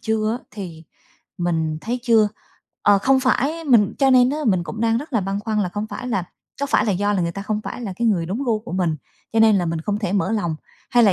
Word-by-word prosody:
chưa 220 -1 0
á - - -27
thì 175 -6 -8 0.6
mình 160 -3 -1
thấy 245 +2 -3
chưa. 225 -4 +4 0.5
Ờ, 205 -1 +5
không 265 +5 +3
phải 285 +5 0
mình 230 -8 +4
cho 270 -1 +4
nên 255 0 +5
á 300 - -2
mình 185 -5 +2
cũng 215 +8 -6
đang 230 0 +2
rất 295 +1 -8
là 225 - +2
băn 195 +2 -2
khoăn 215 -1 -1
là 180 - -1
không 205 +3 -4
phải 250 +3 -6
là 190 -7 -1 0.4
có 285 - 0
phải 215 - +2
là 205 - +2
do 205 +3 0
là 195 - +1
người 170 0 -1
ta 200 - -6
không 215 0 -2
phải - - -6
là 200 -4 -4
cái 235 - 0
người 170 -6 +1
đúng 225 +10 -3
gu 225 -3 +1
của 210 - -10
mình, 175 -4 0 0.4
cho 225 - +3
nên 220 -2 +6
là 175 -2 0
mình 165 -1 -2
không 205 +4 -2
thể 205 -3 -2
mở 200 +1 +1
lòng, 170 -8 -1 0.3
hay 240 0 +5
là 200 - +5
210 Hz, 270 wpm, -21 LUFS, 185-235 Hz, 0.6 s, nên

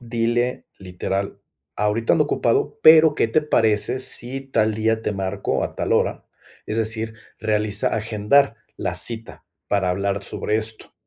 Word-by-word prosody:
Dile 120 +1 -1
literal: 95 +1 -4 0.4
"Ahorita 105 +2 +1
ando 150 - +3
ocupado, 410 - 0
pero, 155 -2 +8
¿qué 115 - +1
te 155 +7 +2
parece 115 -2 +1
si 130 +1 -4
tal 110 -5 0
día, 110 +1 0
te 105 - -2
marco 95 0 -2
a - - -4
tal - - -1
hora?", - - 0 0.4
es 110 - -3
decir, 110 0 -2 0.2
realiza, 105 -1 0
agendar 110 +4 +2 0.2
la - - -3
cita 115 -1 -2 0.2
para 100 -2 +1
hablar 100 +2 -1
sobre 105 - -2
esto, 110 0 -4
110 Hz, 145 wpm, -22 LUFS, 105-120 Hz, 0.4 s, pero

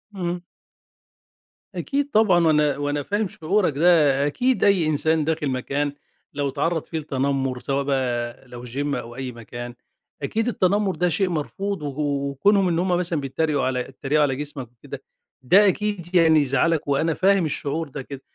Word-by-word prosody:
إمم. 175 -1 -3 1.3
أكيد 285 0 -1
طبعًا، 185 -6 +4
وأنا 150 -2 +3
وأنا 145 0 -2
فاهم 205 +3 -1
شعورك 180 0 0
ده. 150 -5 +4
أكيد 250 - 0
أي 190 -5 +4
إنسان 155 +1 +1
داخِل 155 -2 -1
مكان 140 +3 -2 0.4
لو 140 -1 -1
اتعرَّض 155 +4 -1
فيه 160 - -4
لتنمُّر 135 -3 -1
سواء 140 +2 -1
بقى 125 -2 -2
لو 125 0 -9
gym 140 +4 -2
أو 120 +1 -6
أي 130 -1 -5
مكان، 120 +1 -8 0.5
أكيد 220 - -1
التنمُّر 200 -2 +1
ده 180 0 +1
شيء 190 +2 +1
مرفوض 190 +4 -3
و 140 -2 -5 0.3
وكونهم 195 +7 +3
إن 170 -1 +1
هم 185 - 0
مثلًا 175 -3 -1
بيتّريقوا 140 +2 -1
على 125 -1 0
بيتّريقوا 140 +3 -1
على 135 -2 +1
جسمك 140 -4 -7
وكده، 120 - -10 0.4
ده 195 +11 +5
أكيد 190 -2 -2
يعني 160 -2 +6
يزعّلك 145 +3 +1
وأنا 155 +4 +1
فاهم 195 -1 +3
الشعور 155 +1 -2
ده 135 +1 -6
كده. 135 +1 -9
150 Hz, 160 wpm, -23 LUFS, 135-180 Hz, 1.3 s, يعني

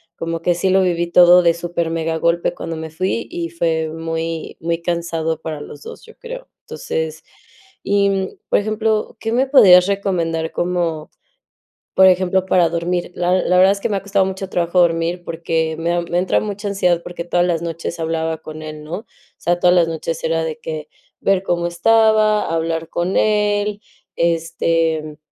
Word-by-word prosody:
como 165 -1 -4
que 175 +1 +1
sí 185 +2 0
lo 190 +1 +4
viví 175 -2 +1
todo 180 0 +7
de 170 -1 +4
supermegagolpe 170 0 -1
cuando 165 - -5
me 160 0 -6
fui 185 +8 -2
y 170 -1 -4
fue 160 -1 -1
muy 165 0 -4
muy 165 0 -2
cansado 165 -2 -2
para 155 -2 -6
los 145 0 -10
2 - - -10
yo 455 - -16
creo. - - -9
Entonces, 160 -1 -5 0.6
y, 200 -1 +1 0.2
por - - +4
ejemplo, 215 +1 -1
¿qué 225 - -3
me 250 +3 +2
podrías 185 -10 +7
recomendar 170 -5 -1
como, 170 -3 -2 0.8
por 190 - +7
ejemplo, 185 0 +2
para 180 -3 +3
dormir? 175 +1 -2
La 180 +1 +1
la 180 - +2
verdad 190 +1 +6
es 200 - -2
que 235 - -1
me 205 - 0
ha 195 - -6
costado 200 -1 +1
mucho 190 0 -5
trabajo 175 0 0
dormir, 170 +1 0
porque 160 -1 -2
me 165 +1 -1
da 175 0 +1
me 175 +1 -1
entra 185 - +1
mucha 205 0 -5
ansiedad, 180 -4 +1
porque 175 -1 -6
todas 175 +1 +1
las 170 -2 -1
noches 170 0 -5
hablaba 160 0 -2
con 155 0 -10
él, 155 -1 -8
¿no? 155 - -11
O 225 - -16 0.3
sea, 175 +1 0
todas 180 0 +4
las 170 -2 +4
noches 165 0 -4
era 165 0 0
de 160 -1 -4
que, 155 -1 -6 0.3
ver 195 -1 +2
cómo 175 -2 -1
estaba, 215 +3 +3
hablar 165 0 -2
con 175 +2 -1
él, 210 -1 +1 0.3
este, 165 -2 0
170 Hz, 180 wpm, -19 LUFS, 165-190 Hz, 0.8 s, todo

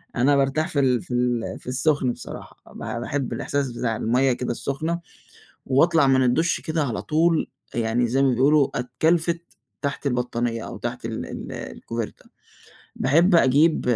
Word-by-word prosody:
أنا 135 +3 +3
بارتاح 140 +3 +1
في 145 - -1
ال 130 -3 +2
في - - -8
ال 120 -1 -1
في - - -17
السُخن 135 0 +1
بصراحة، - - -10
ب - - -11
باحب 130 +3 -3
الإحساس 140 -2 -2
بتاع 115 -1 -2
المَيّة 125 +4 +2
كده 125 0 -3
السُخنة، 155 +7 -2 0.7
وأطلع 160 +2 +4
من 130 -1 +4
الدُش 145 +8 +2
كده 160 -1 -1
على 120 -6 -2
طول 160 +1 +1 0.3
يعني 115 +1 +1
زي 130 +4 +1
ما 135 - +4
بيقولوا 140 +3 +4
أتْكَلفِت 160 +7 +1 0.4
تحت 140 +1 -3
البطانية 120 -2 -1
أو - - -7
تحت - - -5
ال - - -4
ال - - -7
الcoverta. 115 -2 -6 0.7
باحب 165 +8 +4
أجيب 155 +2 +4
135 Hz, 155 wpm, -24 LUFS, 125-155 Hz, 0.7 s, وأطلع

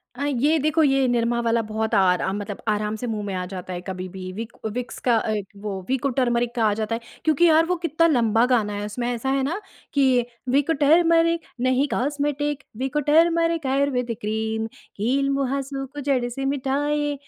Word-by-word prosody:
अ, 280 +3 -3
ये 290 +3 +2
देखो 310 +2 +2
ये 270 -2 +3
निरमा 235 0 +1
वाला 230 0 +2
बहुत 220 0 -3
आरा 185 -1 +3
मतलब 205 0 -5
आराम 210 0 0
से 245 +3 -5
मुँह 215 -2 -3
में 200 - -4
आ 180 0 -2
जाता 185 0 -7
है 175 - -5
कभी-भी 185 0 -6
विक 225 +4 -6 0.2
विक्स 250 +1 -5
का 240 - +5
अ, 220 0 -1 0.3
वो 200 -2 -4
विको 265 +1 +1
टर्मरिक 240 -1 +1
का 235 - +1
आ 210 - +3
जाता 215 +1 -2
है 230 - -6 0.2
क्योंकि 315 +2 +4
यार 320 0 +5
वो 360 +2 0
कितना 330 +1 +3
लंबा 230 -6 +3
गाना 230 -5 +1
है 205 0 -3
उसमें 240 +4 -3
ऐसा 240 +3 -3
है 270 0 +1
ना 330 +9 -1 0.3
कि 260 -4 +3 0.2
विको 285 +5 +2
टर्मरिक 330 +3 +4 0.2
नहीं 255 +2 +2
cosmetic 290 +1 -1
Vicco 265 +4 -1
turmeric 330 -1 +3
Ayurvedic 260 -4 0
cream 220 +1 -2 0.3
कील 265 +7 +1
मुहासे 275 0 -2
को 280 +2 -10
जड़ 265 -3 +1
से 270 +3 -4
मिटाए 290 +2 0
255 Hz, 190 wpm, -23 LUFS, 220-290 Hz, 0.3 s, का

